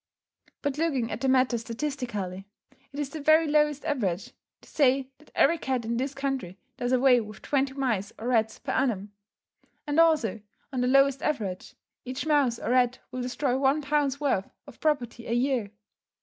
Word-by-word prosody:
But 285 0 -1
looking 275 -8 0
at 215 - -4
the 270 - +1
matter 255 -2 +3
statistically: 230 -7 -4 0.4
it 285 - -7
is 285 -2 -3
the 310 - -6
very 310 +2 +5
lowest 300 -1 +2
average 205 - -1 0.3
to - - -19
say 270 -2 +2
that 305 - -20
every 335 0 +4
cat 260 -5 -2
in 230 +1 -1
this 270 +2 -2
country 270 -10 -3 0.2
does 245 0 -2
away 255 -1 +5
with 215 -1 -10
twenty 275 -1 0
mice 225 -8 -1
or 235 +3 -4
rats 220 -3 +1
per - - -5
annum; 210 -7 0 0.7
and, 295 +1 0
also, 300 - +3 0.3
on 255 - 0
the 250 - +1
lowest 275 +1 +4
average, 205 -11 -3 0.3
each 255 +3 -5
mouse 285 -6 +2
or 230 - -3
rat 250 0 +3
will 255 - -4
destroy 250 +1 -1
one 280 +2 +2
pound's 285 -1 +1
worth 265 -10 0 0.2
of - - -14
property 245 -6 -1
a 230 - -1
year. 245 -3 +1
260 Hz, 180 wpm, -27 LUFS, 235-285 Hz, 0.7 s, very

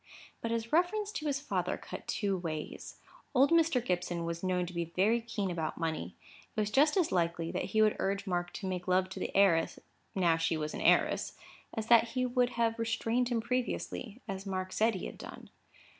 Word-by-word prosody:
But 230 - -2
his 230 +1 -2
reference 405 +5 +2
to 310 -8 -4
his 280 -1 0
father 290 - -1
cut - - -9
two 200 -3 0
ways. 160 -4 -5 0.4
Old 275 +4 +5
Mr. 325 -7 +3
Gibson 175 -2 -1
was 170 0 -3
known 180 -1 +1
to 180 - -8
be 170 -1 -1
very 220 +5 +3
keen 205 -4 -3
about 160 -2 -3
money. 160 - -3 0.4
It - - -1
was 210 0 0
just 300 - +4
as 355 -4 +2
likely 170 -1 0
that - - -2
he 215 +3 +3
would 215 - +3
urge 195 +1 -1
Mark 175 -2 -1
to 215 - -6
make 180 -1 -3
love 185 0 +2
to 190 - -7
the - - -2
heiress, 170 -5 +4 0.4
now 170 -4 +3
she 165 0 0
was 155 0 -3
an - - -5
heiress, - - +3 0.4
as 220 -2 -2
that 235 0 +6
he 255 - +2
would 250 0 +2
have 230 -1 +1
restrained 230 +2 0
him 235 -2 0
previously, 245 -1 -3
as 195 -1 -4
Mark 185 -1 -3
said 220 0 +2
he 185 - -4
had - - -8
done. - - -10
200 Hz, 205 wpm, -32 LUFS, 175-240 Hz, 0.4 s, that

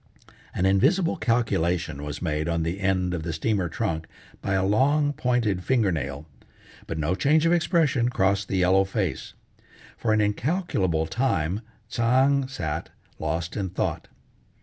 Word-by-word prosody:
An 95 - +1
invisible 145 - +3
calculation 85 - 0
was 75 +3 -5
made 80 -1 -1
on 85 -1 0
the 85 +4 -3
end 95 -2 0
of 85 - -2
the 85 +1 -4
steamer 95 +2 0
trunk 80 -4 -2 0.3
by 100 - -1
a 95 0 +1
long, 145 +8 +2
pointed, 120 -9 0
fingernail, 90 - 0 0.6
but 80 - -4
no 80 +3 0
change 150 - +3
of 165 - +4
expression 160 -8 +2
crossed 100 -3 +1
the 95 - -1
yellow 95 +1 +4
face. 95 - -3 0.6
For 110 - 0
an 110 - +3
incalculable 105 - 0
time 100 - 0 0.3
Tsang 130 +4 +2
sat, 80 - -4 0.3
lost 80 +2 -2
in 100 -3 -2
thought. 90 - -3
95 Hz, 145 wpm, -25 LUFS, 85-125 Hz, 0.6 s, of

